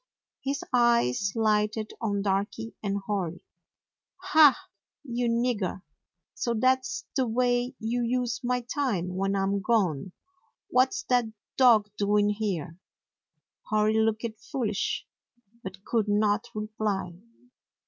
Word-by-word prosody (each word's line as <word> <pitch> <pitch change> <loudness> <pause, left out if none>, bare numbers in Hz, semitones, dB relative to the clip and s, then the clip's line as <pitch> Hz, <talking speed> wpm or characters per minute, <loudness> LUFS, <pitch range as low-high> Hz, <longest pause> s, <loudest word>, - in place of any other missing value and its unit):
His 275 +1 -2
eyes 235 - +3
lighted 215 0 +1
on 200 -3 -1
Darky 205 +3 -2
and 200 -1 -2
Hori. 185 -5 -3 0.9
"Ha, 305 -3 +7 0.5
you 245 -3 -2
nigger! 230 -6 -1 0.5
So 235 -1 -2
that's 255 +3 +1
the 260 -2 +1
way 245 +2 +1
you 235 +2 -2
use 245 0 -1
my 250 0 0
time 230 - -2
when 195 +1 0
I 195 - +1
'm 200 +1 0
gone! 190 - 0 0.6
What 255 +7 +3
's 375 - -4
that 245 -2 +3 0.3
dog 225 -5 +5
doing 205 0 +3
here?" 190 -6 -3 0.9
Hori 215 0 +2
looked 220 +1 +1 0.3
foolish, 215 -7 -1 0.6
but 190 0 -9
could 225 -3 0
not 205 0 +2
reply. 210 -4 -2
215 Hz, 115 wpm, -27 LUFS, 200-245 Hz, 0.9 s, Ha